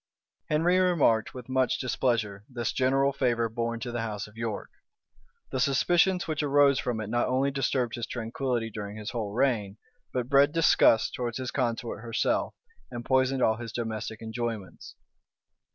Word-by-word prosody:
Henry 170 +4 +3
remarked 160 -13 +2
with 125 -2 -8
much 130 -1 +1
displeasure 115 -5 -1
this 120 -2 -3
general 135 +1 +2
favor 120 -3 +1
borne 115 +1 -3
to 120 0 -4
the 120 -1 -2
house 110 -2 -4
of 105 - -16
York. 115 -2 -4 0.8
The 130 - -2
suspicions 175 +8 +2
which 155 -2 -1
arose 140 -2 +4
from 120 -3 -2
it 110 - -4
not 120 +3 0
only 135 +2 +1
disturbed 130 -3 0
his 120 - -4
tranquillity 120 0 -2
during 105 -1 -6
his 105 +1 -5
whole 110 -4 -3
reign, 110 -4 0 0.3
but 125 -2 -2
bred 140 +2 +4
disgust 160 -8 +4
towards 120 -2 -3
his 130 -2 -4
consort 120 -4 -2
herself, 115 -1 -1 0.3
and 120 -1 -7
poisoned 130 0 +2
all 110 0 +3
his 115 -1 -7
domestic 110 -1 -4
enjoyments. 110 -4 -5
120 Hz, 160 wpm, -28 LUFS, 115-135 Hz, 0.8 s, arose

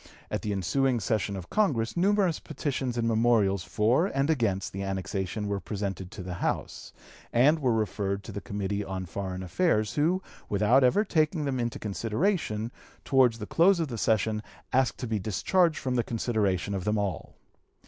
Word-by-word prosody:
At - - -1
the 105 - -2
ensuing 120 +7 +1
session 105 -1 -1
of 90 -2 -8
Congress 135 - +1
numerous 190 -1 +2
petitions 135 -4 -3
and 115 -1 +1
memorials 110 -5 +3
for 120 - +2
and 140 -2 +1
against 105 -10 0
the 95 - -4
annexation 95 +1 -3
were 100 -1 -1
presented 95 -3 -4
to 100 -2 -8
the 90 0 -5
House,... - - -3 0.4
and 145 +7 +4
were 130 -4 +2
referred 100 -2 -1
to - - -8
the 100 0 -5
Committee 100 +3 -3
of 95 -2 -5
Foreign 95 +1 -4
Affairs, 110 - +1
who, 165 +7 +2 0.3
without 105 +6 +4
ever 195 +12 +4
taking 155 -3 +1
them 135 -2 -1
into 120 -1 -2
consideration, 115 - -1 0.3
towards 130 -4 +4
the 105 - -6
close 175 - +4
of 160 -4 -1
the 120 - -4
session 110 0 +1 0.3
asked 130 -1 +2
to 125 - -4
be 110 -2 -1
discharged 155 - +2
from 130 - -2
the 120 -2 +1
consideration 105 -5 -1
of 95 -2 -2
them 105 +2 +1
all. 100 -3 -3
110 Hz, 175 wpm, -28 LUFS, 100-135 Hz, 0.4 s, and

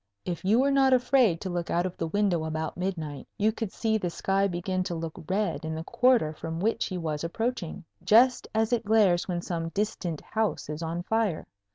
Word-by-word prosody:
If 175 -1 -4
you 205 +4 +3
were 275 +2 +3
not 270 -1 +4
afraid 250 -8 +3
to 190 - -4
look 175 -1 -3
out 175 +1 +1
of 185 - -4
the 165 - -3
window 190 -2 +1
about 160 0 -3
midnight, 160 -6 -4
you 215 +1 +3
could 220 -2 -4
see 220 -1 0
the 180 - -2
sky 195 +3 +1
begin 185 +1 -2
to 175 -2 -3
look 165 +1 -6
red 195 -3 0
in 160 0 -3
the 160 - -4
quarter 235 -6 +3
from 165 +1 -5
which 220 +5 +1
he 185 - -4
was 155 -3 -3
approaching, 195 0 -3 0.2
just 245 +4 +5
as 220 +2 +2
it 235 - +1
glares 205 -5 +3
when 175 -2 -2
some 165 -2 -3
distant 180 -4 -2
house 220 -8 -2
is 150 +1 -4
on 165 +1 -3
fire. 220 -4 0
185 Hz, 210 wpm, -27 LUFS, 165-220 Hz, 0.2 s, just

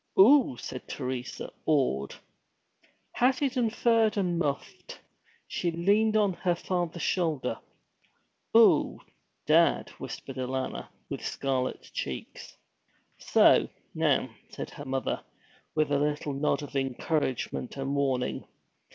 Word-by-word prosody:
'Oo!' 245 - +7
said 130 +2 -7
Teresa, 125 -2 -5 0.2
awed. 130 - +1 1.0
Hatted, 255 -2 +1
furred, 225 -2 +2
and 180 -4 0
muffed, 140 -4 -4 0.5
she 175 - -1
leaned 205 +6 +2
on 205 -3 +3
her 175 0 0
father's 175 -2 -2
shoulder. 155 -10 0 1.0
'Oo - - +5 0.5
dad!' - - +4
whispered 135 - -7
Alanna, 130 0 -3 0.2
with - - -6
scarlet 130 -2 -2
cheeks. - - -6 0.6
'So - - +5 0.2
now!' - - +1 0.2
said - - -7
her - - -9
mother, 135 0 -2 0.5
with 155 -2 +1
a 140 - +3
little 150 0 -1
nod 140 +1 0
of 145 - -9
encouragement 135 -1 -2
and 135 +1 -2
warning. 135 -3 -1
150 Hz, 110 wpm, -28 LUFS, 135-190 Hz, 1.0 s, Oo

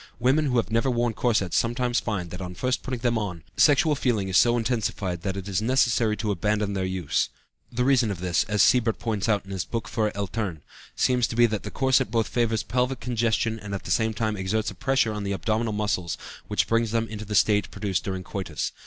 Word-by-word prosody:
Women 135 +6 +2
who 125 -2 +1
have 115 - 0
never 115 +4 +2
worn 120 -1 0
corsets 105 -7 0
sometimes 120 +1 +1
find 95 -6 -3
that, 90 - -6
on 90 -1 -6
first 125 +5 -1
putting 125 -2 -4
them 120 -2 +1
on, 90 -7 -5
sexual 150 +1 +4
feeling 115 -8 0
is 95 - -2
so 120 0 +5
intensified 105 -6 -1
that 95 +2 -3
it 95 0 -6
is 100 0 -1
necessary 115 -2 +2
to 105 -3 -1
abandon 105 +2 0
their 95 -1 -1
use. 95 -5 -1 0.4
The 125 +1 0
reason 130 -4 +3
of 100 -4 -4
this 90 -1 +1
(as 105 -3 +3
Siebert 115 -3 +3
points 110 -2 -2
out 105 -2 +1
in 95 - -10
his 95 -3 -2
Buch 115 -2 -3
für 105 0 -1
Eltern) 100 -4 -3 0.3
seems 125 -2 +2
to - - -6
be 120 0 +6
that 110 -3 -1
the 105 - -6
corset 130 -3 +2
both 115 0 +1
favors 115 -2 0
pelvic 125 +2 -1
congestion 115 -2 0
and 100 -1 -5
at 95 - -6
the - - -5
same 110 +4 +1
time 110 -1 -1
exerts 105 +3 -1
a - - -9
pressure 115 +2 +1
on 105 -1 -4
the 100 0 -2
abdominal 110 +5 -1
muscles 105 -5 -1 0.3
which - - +1
brings 115 0 +2
them 115 +1 0
into 105 -1 -6
the 105 0 -3
state 105 +1 +3
produced 100 -3 -2
during 95 -1 -4
coitus. 90 -5 -4
110 Hz, 225 wpm, -25 LUFS, 100-120 Hz, 0.4 s, be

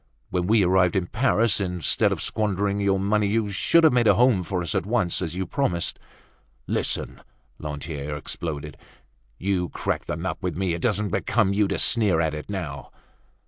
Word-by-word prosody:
When 90 -1 -1
we 110 -1 +4
arrived 90 -1 +3
in 95 -2 +1
Paris, 115 0 +2
instead 90 -3 +1
of - - -2
squandering 100 -2 -1
your 100 -1 +2
money, 105 +1 +1
you 105 0 0
should 165 - +3
have 160 - +6
made 120 -2 +3
a 100 - +6
home 120 -4 +4
for 90 0 -3
us 85 - -2
at - - 0
once, 105 -7 +1
as 85 -2 -3
you 95 +1 -2
promised." 90 -5 -1 0.7
"Listen!" - - -2 0.4
Lantier 75 0 -5
exploded. 75 -1 -5 0.6
"You 90 -1 -1
cracked - - -3
the - - -2
nut - - -4
with - - -3
me; 95 -2 0
it 85 - -4
doesn't 105 -2 0
become 105 +2 +1
you 105 0 +2
to - - -2
sneer 105 -8 +3
at 80 -2 0
it 75 +4 -7
now!" 85 -9 -5
95 Hz, 185 wpm, -24 LUFS, 85-105 Hz, 0.7 s, have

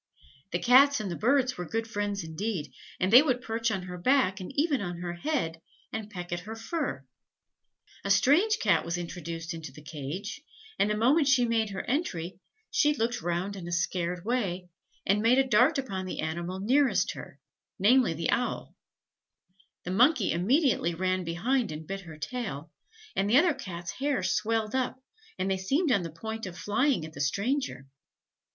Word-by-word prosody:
The 175 - +1
Cats 270 +8 +6
and 205 -4 -3
the - - -3
Birds 255 +1 +2
were 180 - -5
good 225 0 -2
friends 205 -3 -2
indeed: 160 - -4 0.3
they 210 +8 +7
would 255 -5 +1
perch 230 -1 -1
on 195 -4 -2
her 180 0 -7
back, 230 -3 +2
and 185 - -7
even 290 -4 +2
on 175 -3 -4
her 175 0 -4
head, 175 - -2 0.3
and 220 -1 -4
peck 180 -4 -7
at 175 - -2
her 215 +5 -8
fur. 225 - -3 1.0
A 200 - -3
strange 305 - +4
Cat - - +2
was 170 +1 -2
introduced 170 -1 -5
into 160 -4 -7
the 150 +3 -14
cage, 160 - -6 0.4
and 205 - +3
the 210 - 0
moment 275 +7 +4
she 260 -3 +4
made 225 -2 +1
her 195 -1 -4
entry, 185 - -2 0.3
she 295 -1 +3
looked 240 -1 -1
round 175 +4 -2
in 180 -3 -7
a - - -5
scared 175 0 -1
way, 190 -7 -1 0.4
and 200 +2 +2
made 235 +3 +4
a 270 0 +3
dart 255 +6 +4
upon 195 -9 -3
the - - -5
animal 170 +4 -3
nearest 260 +7 +2
her, - - -10 0.4
namely 220 -2 +4
the 165 +1 -1
owl; 245 - -2 1.1
the 180 - -4
Monkey 245 - +4
immediately 195 - +2
ran 185 +1 0
behind 205 +8 0
and 155 +1 -7
bit 195 +4 -5
her 165 -4 -11
tail, 155 - -5 0.4
and 195 +1 +1
the 240 - +6
other 335 +2 +5
Cats' 175 -9 -6
hair 275 +6 -1
swelled 220 -1 0
up, 260 0 -1 0.4
and 190 +1 -1
they 190 - +1
seemed 275 - +1
on 200 -6 +3
the 170 - -5
point 220 +6 -6
of 175 -1 -8
flying 240 - +1
at 155 - -10
the 145 - -6
stranger. 200 - -1
200 Hz, 180 wpm, -28 LUFS, 175-250 Hz, 1.1 s, they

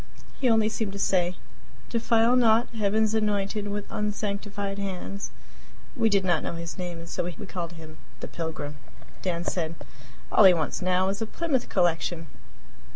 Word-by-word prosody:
He 260 - +3
only 220 -1 +4
seemed 220 -2 -2
to - - -5
say, 185 -2 +2 0.6
"Defile 230 +1 +4
not 230 -1 +4
Heaven's 215 0 +1
anointed 210 -1 0
with 205 0 -3
unsanctified 205 -2 -2
hands." 195 0 -4 0.7
We 230 -4 +3
did 200 -2 +2
not 175 -4 +3
know - - -3
his 165 0 -5
name, 180 -2 -4
and 165 0 -9
so - - -2
we 175 - -4
called 175 -3 -5
him 160 -1 -11 0.2
"The - - -5
Pilgrim." 155 -3 -5 0.4
Dan 175 -2 -1
said: 165 -2 -2 0.6
"All 210 - +7
he 185 -2 +9
wants 160 -3 -1
now 185 +1 +2
is 200 +2 -3
a 225 - -1
Plymouth 285 -2 -1
Collection." 175 -2 +1
200 Hz, 160 wpm, -27 LUFS, 175-215 Hz, 0.7 s, he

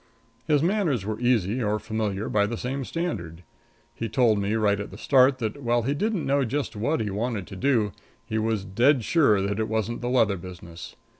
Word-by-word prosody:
His 150 -2 +3
manners 170 - +1
were 110 0 -3
easy 120 -2 +1
or 105 -1 +1
familiar 110 -2 -3
by 105 -1 +2
the 115 +2 -4
same 135 +3 -3
standard. 95 - -4 0.5
He 115 - -4
told 115 -2 +3
me 100 +2 0
right 105 -2 +2
at 105 - -5
the - - -11
start 130 -1 +4
that, 115 +3 -4
while 120 -1 +1
he 135 +4 0
didn't 205 +3 -1
know 140 +1 +2
just 135 +1 -2
what 120 +9 0
he 105 -2 -2
wanted 105 -1 -2
to 95 - -10
do, 115 -2 +1 0.3
he 110 - -2
was 110 -3 -1
dead 120 +7 +3
sure 110 -10 +3
that 100 +2 -2
it 110 - -1
wasn't 110 +2 -2
the 120 - -2
leather 115 -6 +3
business. 85 -1 -10
115 Hz, 205 wpm, -25 LUFS, 105-130 Hz, 0.5 s, start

